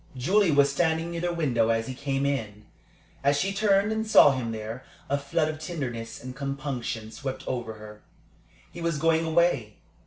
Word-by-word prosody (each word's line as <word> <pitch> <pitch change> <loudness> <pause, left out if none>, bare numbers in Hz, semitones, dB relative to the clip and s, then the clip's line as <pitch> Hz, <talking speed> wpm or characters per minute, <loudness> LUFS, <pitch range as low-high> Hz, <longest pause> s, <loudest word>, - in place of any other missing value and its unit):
Julie 190 +9 +3
was 140 -2 +4
standing 160 +2 0
near 170 -1 -4
the 175 0 0
window 130 -9 +1
as 115 0 +1
he 130 - -5
came 135 +1 -2
in. 110 -7 -3 0.6
As 140 +1 +3
she 195 +4 0
turned 200 0 +3
and 220 0 -1
saw 180 -8 +8
him 125 -4 -2
there, 110 +3 -6 0.3
a - - +4
flood 155 +3 0
of 155 0 -4
tenderness 130 -10 -5
and 130 0 -7
compunction 135 -5 -4
swept 135 0 -5
over 120 -3 -3
her. 105 -1 -12 0.7
He 170 - -9
was 165 -2 0
going 165 +1 +2
away. 160 -10 +1
140 Hz, 180 wpm, -27 LUFS, 120-165 Hz, 0.7 s, saw